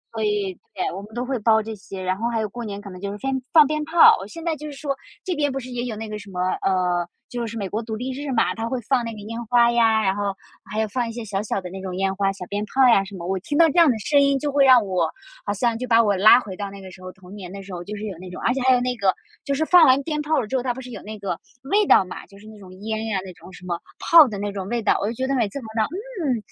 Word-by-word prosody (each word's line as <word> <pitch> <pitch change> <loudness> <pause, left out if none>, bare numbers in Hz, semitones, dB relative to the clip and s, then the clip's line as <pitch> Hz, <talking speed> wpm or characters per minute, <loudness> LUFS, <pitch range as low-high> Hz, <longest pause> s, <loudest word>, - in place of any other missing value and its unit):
所 220 - -2
以， 205 -2 0 0.2
对， - - -1
我 190 - -6
们 205 +2 -13
都 245 +1 -2
会 260 -1 -2
包 220 0 +3
这 220 0 -6
些， 190 -1 -9
然 185 0 0
后 230 +4 -2
还 230 -1 -1
有 215 - -1
过 240 +4 -7
年 205 -2 -5
可 200 -1 -10
能 180 0 -10
就 200 0 -3
是 205 - -6
先 265 +3 -2
放 315 -3 +8
鞭 305 +1 -1
炮。 325 +2 +7
我 190 - -7
现 330 +10 -9
在 330 -2 0
就 300 +1 -8
是 295 - -7
说 280 -1 -2 0.3
这 370 - -1
边 290 -2 0
不 270 - -3
是 255 -1 -9
也 245 0 -3
有 235 -3 -4
那 220 +1 -6
个 210 0 -6
什 200 0 -12
么， 180 -2 -6 0.2
呃， 180 -2 +1 0.2
就 240 -1 -3
是 230 +1 -6
美 200 -3 -3
国 215 +4 -3
独 220 -1 -5
立 250 +4 -4
日 280 +2 -5
嘛， 235 -3 +2
它 225 +1 -4
会 255 - -2
放 260 -3 +2
那 230 - -4
个 220 - -9
烟 230 +3 -6
花 235 0 +4
呀， 225 -2 +3
然 190 -1 +1
后 200 -1 -2 0.4
还 215 +1 0
有 220 - 0
放 240 +2 -2
一 - - -5
些 230 0 -6
小 200 -2 -2
小 210 -1 -2
的 180 -1 -8
那 190 0 -7
种 185 -1 -5
烟 190 +1 0
花、 195 0 +1
小 195 -2 -8
鞭 205 +3 -3
炮 265 +4 +4
呀 200 -4 +5
什 195 +1 -10
么。 170 -2 -7
我 190 +1 -1
听 290 +10 -3
到 335 - +7
这 - - -3
样 335 -3 +7
的 240 - +1
声 285 +7 +3
音 280 0 +3
就 290 +2 -2
会 280 0 +4
让 255 -4 +6
我 185 -2 0 0.4
好 - - +1
像 235 +3 0
就 255 - -4
把 230 -1 +5
我 205 -2 +2
拉 215 +5 +7
回 205 -6 -7
到 200 +1 -5
那 200 0 -10
个 190 -1 -10
时 185 - -14
候， 185 0 -8
童 190 +1 -14
年 185 -4 -8
的 195 0 -8
时 190 -1 -10
候 175 -1 -5
就 210 +4 -7
是 205 - -7
有 200 -3 -5
那 185 0 -9
种。 180 - -8
而 240 - +2
且 265 - -2
还 260 0 +5
有 245 - +1
那 250 0 -1
个， 200 -4 +2 0.3
就 280 - -1
是 315 +3 0
放 350 -1 +7
完 265 +2 +4
鞭 300 0 -2
炮 310 +1 +1
了 - - -2
之 240 - -4
后， 260 - +1
它 245 -1 -2
不 - - -8
是 250 -1 -10
有 - - -8
那 215 +1 -8
个 195 -4 -4 0.2
味 405 +9 +2
道 - - +6
嘛， 180 - -8
就 200 - -17
是 205 - -16
那 215 -1 -12
种 190 -2 -13
烟 220 +1 -3
呀， 210 -3 -1
那 185 - -9
种 180 - -15
什 180 0 -13
么 175 -1 -3 0.2
炮 330 -4 +7
的 210 -4 -5
那 205 +1 -3
种 195 -2 -5
味 235 +1 -2
道。 - - +3
我 200 - 0
就 225 - -2
觉 260 - -2
得 270 - -1
每 230 -5 +1
次 200 - -7
闻 265 - -7
到， 220 -1 +2
嗯， 360 - -3
220 Hz, 360 characters per minute, -23 LUFS, 195-260 Hz, 0.4 s, 放